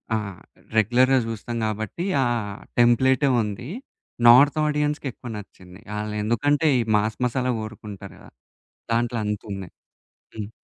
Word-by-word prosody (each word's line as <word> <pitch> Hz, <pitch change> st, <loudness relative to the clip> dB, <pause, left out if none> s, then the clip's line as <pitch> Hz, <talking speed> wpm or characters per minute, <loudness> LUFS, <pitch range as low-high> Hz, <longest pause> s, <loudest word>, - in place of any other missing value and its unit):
ఆ! -, -, +2 dB, 0.6 s
రెగ్యులర్‌గా 125 Hz, +4 st, +4 dB
జూస్తాం 115 Hz, +1 st, -5 dB
కాబట్టి, 110 Hz, -, -3 dB, 0.2 s
ఆ! -, -, +1 dB, 0.5 s
టెంప్లేటే 130 Hz, +4 st, +4 dB
ఉంది. 105 Hz, +3 st, -5 dB, 0.6 s
నార్త్ 140 Hz, +6 st, +7 dB
ఆడియన్స్‌కి 150 Hz, -1 st, -1 dB
ఎక్కువ 120 Hz, +1 st, -10 dB
నచ్చింది. 95 Hz, -2 st, -12 dB, 0.2 s
ఆళ్లెందుకంటే, 110 Hz, +8 st, 0 dB
ఈ -, -, +2 dB, 0.2 s
మాస్ 110 Hz, +1 st, -1 dB
మసాలా 125 Hz, +1 st, 0 dB
కోరుకుంటారు 105 Hz, -3 st, -9 dB
కదా, -, -, -16 dB, 0.6 s
దాంట్లో 120 Hz, 0 st, 0 dB
అంత 105 Hz, 0 st, -2 dB
ఉంది. 95 Hz, -2 st, -7 dB, 0.7 s
హ్మ్. 105 Hz, -1 st, -5 dB
115 Hz, 120 wpm, -24 LUFS, 105-130 Hz, 0.7 s, నార్త్